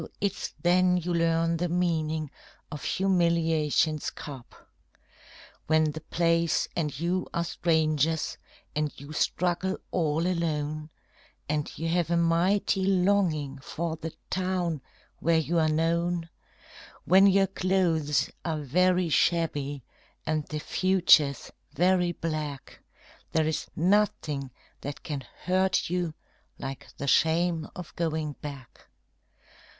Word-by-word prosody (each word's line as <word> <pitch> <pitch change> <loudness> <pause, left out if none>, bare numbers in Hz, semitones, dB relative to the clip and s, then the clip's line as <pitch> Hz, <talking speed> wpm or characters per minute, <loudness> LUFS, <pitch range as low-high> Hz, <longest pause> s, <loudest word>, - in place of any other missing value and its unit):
it's 200 -1 -2
then 180 +1 +4
you 175 0 -2
learn 165 0 +2
the 175 +1 -1
meaning 160 -3 0 0.4
of 150 -2 -6
humiliation's 165 -5 +1
cup. 135 -4 -11 1.0
When 155 0 +3
the 155 +1 -7
place 165 +1 +1
and 150 -5 -2
you 175 +2 -1
are 170 - +1
strangers 160 -2 +1 0.4
and 150 -1 0
you 140 +2 -9
struggle 180 +4 0
all 160 -1 +1
alone, 155 -3 -1 0.6
And 150 0 -1
you 165 - -2
have 170 -1 +1
a 170 - +2
mighty 180 +4 +2
longing 180 -7 +1
for 160 +4 -4
the 160 0 -6 0.2
town 180 -5 -1 0.4
where 165 0 +3
you 165 +2 +1
are 155 -1 +3
known; 165 +2 0 0.8
When 190 +3 +7
your 195 0 +5
clothes 180 -6 +1
are 160 -2 -1
very 180 +5 +2
shabby 145 -4 +1 0.4
and 155 -1 -1
the 155 - -4
future's 170 -6 +3 0.2
very 180 +1 +3
black, 155 -4 -5 0.5
There 160 -1 +3
is 155 -1 -2
nothing 165 -7 +1 0.3
that 145 0 -6
can 145 -3 -4 0.2
hurt 185 -1 +1
you 175 -3 -1 0.4
like 135 0 -6
the 140 - -4
shame 160 +3 +2
of 180 -3 -9
going 160 -3 -1
back. 140 -4 -9
165 Hz, 115 wpm, -28 LUFS, 155-180 Hz, 1.0 s, When